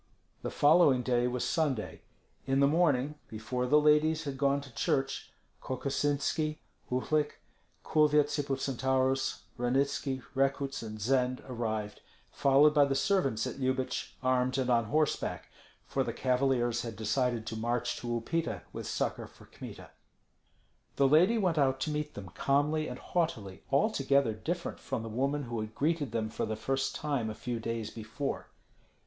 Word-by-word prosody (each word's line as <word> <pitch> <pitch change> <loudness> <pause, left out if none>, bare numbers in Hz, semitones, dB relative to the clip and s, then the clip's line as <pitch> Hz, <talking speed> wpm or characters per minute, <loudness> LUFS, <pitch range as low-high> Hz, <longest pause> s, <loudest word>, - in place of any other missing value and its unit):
The - - -3
following 145 -4 +5
day 125 0 +2
was 125 0 -2
Sunday. 135 -5 -1 0.5
In 135 0 +2
the 140 - +6
morning, 150 -2 +2
before 120 +3 -3
the 150 +4 +5
ladies 150 +1 +3
had 140 -3 -4
gone 140 +1 +2
to 135 -3 -13
church, 135 +4 -1 0.3
Kokosinski, 145 +3 -1 0.3
Uhlik, 145 +4 0 0.5
Kulvyets 150 -1 +3
Hippocentaurus, 135 -1 0 0.2
Ranitski, 135 +1 0
Rekuts, 135 0 0
and 110 -1 -7
Zend 125 +3 +1
arrived, 110 -4 -3 0.3
followed 140 +2 +5
by 145 -2 +6
the 140 -1 0
servants 135 - +1
at - - -5
Lyubich, 130 0 -2
armed 130 0 +2
and 130 -1 +1
on 115 -1 +3
horseback, 150 +6 -1 0.3
for - - 0
the - - -3
cavaliers 125 -2 +1
had 115 -2 -6
decided 115 +2 0
to 110 - -4
march 120 +2 -1
to 120 - -7
Upita 120 +8 -2
with - - -5
succor - - -2
for - - -18
Kmita. - - -10 1.0
The 140 - +4
lady 175 +11 +5
went 180 -7 +1
out 135 -1 +2
to 155 - -1
meet 150 0 -3
them 95 -3 -7
calmly 145 - +1
and 125 - -6
haughtily, 115 - -2
altogether 140 - +2
different 170 +11 -4
from 110 - -4
the 115 - -5
woman 140 +6 -1
who 120 -2 -4
had 110 0 -5
greeted 150 -4 0
them 110 -1 -1
for - - -2
the 110 - -2
first 135 +5 -1
time 140 -7 -1
a 110 - -5
few 120 0 -4
days 115 -1 -3
before. 115 +5 -4
135 Hz, 155 wpm, -31 LUFS, 120-145 Hz, 1.0 s, the